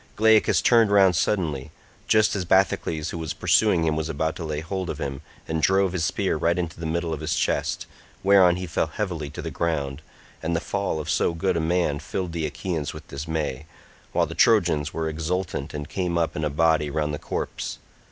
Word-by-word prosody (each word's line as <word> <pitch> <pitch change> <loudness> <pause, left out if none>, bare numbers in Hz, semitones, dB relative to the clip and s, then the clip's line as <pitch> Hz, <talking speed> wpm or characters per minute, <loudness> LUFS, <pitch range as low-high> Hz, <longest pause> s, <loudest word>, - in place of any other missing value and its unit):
Glaucus 110 0 +4
turned 115 -3 +5
round 95 -3 +5
suddenly, 80 -7 0 0.4
just 110 -1 +4
as 95 - -1
Bathycles 85 -4 +1
who 85 - -5
was 80 -2 -4
pursuing 100 -6 +3
him 80 -1 +1
was 80 0 -2
about 80 +1 -1
to 85 - -5
lay 75 -2 -3
hold 90 +3 -4
of - - -3
him, 70 -1 -4 0.3
and 80 0 -1
drove 95 +1 +3
his 90 -3 -1
spear 95 0 0
right 85 +2 +1
into 85 -2 -3
the 80 - -3
middle 85 0 -1
of 75 - -4
his 80 +1 -1
chest, - - -1 0.4
whereon 95 -3 +6
he 90 +1 -4
fell 85 - 0
heavily 85 -8 -4
to - - -7
the - - -4
ground, 70 -5 -2 0.4
and 85 +1 -1
the - - +2
fall 100 -2 -2
of 75 - -5
so 85 - +1
good 95 +2 0
a - - +1
man 80 -3 +1
filled 90 +2 -4
the 80 -2 -2
Achaeans 75 +1 -4
with - - -10
dismay, 75 -1 -3 0.4
while - - +2
the - - -7
Trojans 85 -9 +3
were 80 -1 -2
exultant, 80 -1 -3
and 75 -1 -5
came 90 -3 -2
up 85 -1 0
in 75 - -2
a 75 - +1
body 75 0 +2
round 75 0 -1
the 75 - -4
corpse. - - -4
80 Hz, 210 wpm, -24 LUFS, 75-90 Hz, 0.4 s, whereon